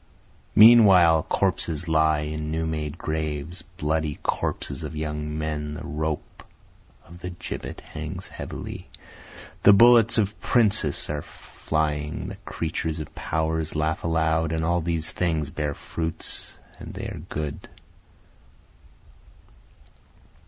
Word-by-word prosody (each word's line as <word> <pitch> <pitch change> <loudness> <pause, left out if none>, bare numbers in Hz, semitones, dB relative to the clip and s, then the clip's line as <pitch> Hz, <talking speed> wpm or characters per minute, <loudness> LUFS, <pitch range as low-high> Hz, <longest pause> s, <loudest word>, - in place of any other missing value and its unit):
Meanwhile 100 -8 +8
corpses 85 -4 0
lie 80 -1 +3
in 75 0 -4
new 80 +1 -1
made 75 -1 -3
graves, 80 +1 -3 0.2
bloody 80 -1 -1
corpses 70 - -2
of 75 0 -6
young 75 0 -3
men, 75 -1 -3
The - - -7
rope 80 0 -4 0.6
of 85 +1 -13
the 90 - -5
gibbet 90 - -7
hangs - - -7
heavily, - - -7 0.7
the 100 - +8
bullets 115 +2 +7
of 105 -1 0
princes 105 - +2
are 75 -1 -2
flying, 75 -1 -3
the - - -7
creatures 80 0 -3
of 75 - -7
power 80 0 -1
laugh 80 0 -1
aloud, 80 -1 +1
And 80 0 -1
all 85 +1 +1
these 80 -1 -1
things 80 -5 -1
bear 75 -3 -2
fruits, 80 -1 -3 0.2
and - - -9
they - - -5
are - - -6
good. 75 -2 -5
80 Hz, 120 wpm, -25 LUFS, 75-85 Hz, 0.7 s, Meanwhile